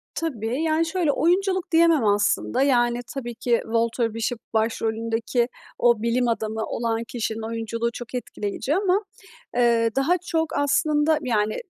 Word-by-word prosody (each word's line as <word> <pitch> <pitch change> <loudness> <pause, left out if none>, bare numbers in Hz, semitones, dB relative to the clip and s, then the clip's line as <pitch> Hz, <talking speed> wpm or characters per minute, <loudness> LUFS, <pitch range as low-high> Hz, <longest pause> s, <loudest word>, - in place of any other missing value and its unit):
Tabii, 255 -4 -2
yani, 320 +1 +2
şöyle, 325 -3 +1
oyunculuk 370 +3 +1
diyemem 325 -6 +4
aslında, 205 +5 +1
yani, 240 -3 +3
tabii 240 -4 -5
ki 240 0 +1
Walter 230 0 0
Bishop 230 +1 -2
başrolündeki 225 +1 0 0.3
o 235 -3 +3
bilim 240 +1 +1
adamı 220 -1 -1
olan 230 -1 -2
kişinin 225 -2 -3
oyunculuğu 230 +1 -2
çok 240 +1 -7
etkileyici 240 +4 -3
ama, 390 +2 +2 0.5
eee, 235 -2 +3
daha 300 +7 +3
çok 320 -1 0
aslında, 295 +2 +2
yani, 215 -3 0
240 Hz, 135 wpm, -24 LUFS, 225-305 Hz, 0.5 s, diyemem